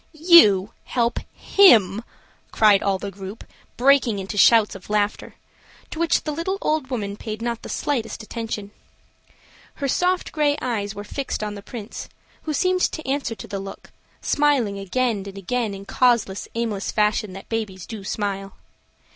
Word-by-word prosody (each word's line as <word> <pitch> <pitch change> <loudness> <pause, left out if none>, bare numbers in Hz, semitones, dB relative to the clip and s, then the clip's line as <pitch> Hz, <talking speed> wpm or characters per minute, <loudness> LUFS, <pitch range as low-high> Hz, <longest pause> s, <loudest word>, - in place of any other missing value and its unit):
"You 300 - +6
help 235 -1 0
him!" 225 - +5 0.5
cried 210 -3 +5
all 195 -1 +1
the 200 +1 -6
group 195 +3 -9 0.3
breaking 260 -4 +4
into 195 +1 -5
shouts 220 +1 +5
of 195 0 -12
laughter, 210 0 -1 0.6
to 320 - -6
which 335 0 +2
the 305 - -3
little 335 +6 -2
old 305 -4 -1
woman 205 -6 -3
paid 215 0 -6
not 235 0 -3
the - - -9
slightest 235 -5 -2
attention. 215 -2 -5 1.0
Her 280 - -3
soft 360 +6 0
gray 295 -2 +1
eyes 215 -4 -3
were 205 - -6
fixed 265 +1 -4
on 210 -1 -3
the 200 - -8
Prince, 220 0 -8 0.4
who 310 - -2
seemed 370 +1 +1
to 315 - -1
answer 270 -4 -1
to 195 - -10
the 200 - -4
look, 195 0 -9 0.3
smiling 265 -9 +1
again 230 +4 0
and 195 0 -8
again 220 +1 -2
in 195 - -9
the 200 - -11
causeless, 235 -6 +2
aimless 225 -4 -2
fashion 210 -1 +1
that 195 - -10
babies 205 -6 -4
do 220 -3 -8
smile. 195 -1 -4
220 Hz, 165 wpm, -23 LUFS, 200-265 Hz, 1.0 s, You